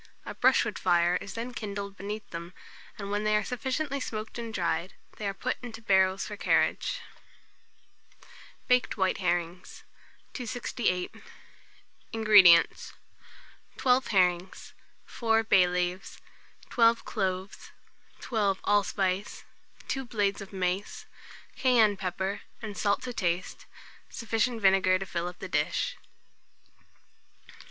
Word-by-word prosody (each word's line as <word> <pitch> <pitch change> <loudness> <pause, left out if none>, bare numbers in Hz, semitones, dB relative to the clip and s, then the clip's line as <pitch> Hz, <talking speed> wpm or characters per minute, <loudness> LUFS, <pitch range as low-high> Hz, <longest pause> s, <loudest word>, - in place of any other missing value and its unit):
A - - -6
brushwood - - +2
fire 175 -1 +3
is 200 - -8
then 240 +2 -5
kindled 200 -3 -5
beneath 205 +2 -6
them, 170 +1 -7 0.4
and 200 -1 -6
when 205 +1 -1
they 215 0 +2
are 210 - +2
sufficiently 270 +3 -2
smoked 220 -2 -5
and 230 -1 -5
dried, 170 -2 -2 0.2
they 210 - -3
are 195 - -2
put 255 +5 -2
into 230 -3 -8
barrels 190 -3 +2
for 210 - -6
carriage. - - +1 1.7
BAKED 250 -3 +2
WHITE 190 -1 +1
HERRINGS. 175 -1 -2 0.5
268. 240 -6 -2 1.0
INGREDIENTS. 210 -6 +6 0.8
12 255 0 +2
herrings, 180 -2 0 0.3
4 225 -1 +1
bay 190 -4 +5
leaves, 180 +1 -3 0.5
12 230 -1 +3
cloves, 190 -2 -3 0.5
12 205 -5 0
allspice, 200 -1 0 0.4
2 270 - -1
small 265 - -6
blades 205 -4 -1
of 195 - -9
mace, 185 0 -3 0.5
cayenne 240 -5 +4
pepper 190 +1 -3 0.2
and 215 -3 -7
salt 200 0 0
to 250 - -5
taste, 180 -3 -2 0.4
sufficient 230 0 -1
vinegar 190 -1 +4
to 195 - -5
fill 175 -1 -3
up 180 - -8
the - - -7
dish. - - -1
200 Hz, 120 wpm, -28 LUFS, 185-230 Hz, 1.7 s, INGREDIENTS